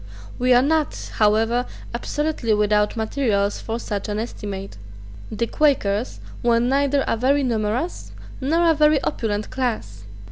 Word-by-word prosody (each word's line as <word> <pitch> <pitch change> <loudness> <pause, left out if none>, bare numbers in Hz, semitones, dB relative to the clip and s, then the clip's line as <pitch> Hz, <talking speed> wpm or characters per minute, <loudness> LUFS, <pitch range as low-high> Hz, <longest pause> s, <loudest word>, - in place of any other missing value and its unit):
We 250 +1 +2
are 245 - +5
not 310 0 -1
however 225 +3 +2 0.3
absolutely 270 -2 -1
without 210 +1 +2
materials 220 -3 0
for 225 0 -4
such 210 -2 -4
an 205 - -2
estimate. 200 - -6 0.5
The 225 +2 -1
Quakers 240 -6 +1 0.2
were 235 -1 +3
neither 275 +3 +2
a - - 0
very 275 +5 +2
numerous 235 +6 -2 0.3
nor 330 +6 +2
a 325 - +5
very 300 -1 +4
opulent 215 -6 -2
class. 215 - -3
235 Hz, 135 wpm, -22 LUFS, 210-275 Hz, 0.5 s, are